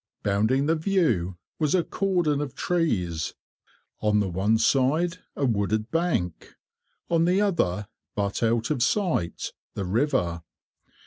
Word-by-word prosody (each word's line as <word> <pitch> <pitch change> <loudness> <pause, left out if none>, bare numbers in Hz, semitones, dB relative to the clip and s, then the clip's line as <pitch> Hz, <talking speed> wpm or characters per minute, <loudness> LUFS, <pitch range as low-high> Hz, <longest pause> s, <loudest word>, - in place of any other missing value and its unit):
Bounding 110 +7 +2
the 160 - +3
view 155 - +1 0.2
was 155 +1 +2
a 180 - +3
cordon 175 -8 0
of 140 -4 -5
trees; 95 - -1 0.6
on 105 -1 +2
the 100 -2 0
one 100 +5 +2
side 145 +9 +2 0.2
a 140 - 0
wooded 110 0 0
bank; 165 - -1 0.5
on 165 -1 +2
the 180 +3 +3
other, 105 - +1 0.3
but 100 -1 -1
out 115 +1 +1
of 140 -5 0
sight, 155 - 0 0.2
the 100 - -2
river. 95 - 0
125 Hz, 130 wpm, -26 LUFS, 100-165 Hz, 0.6 s, the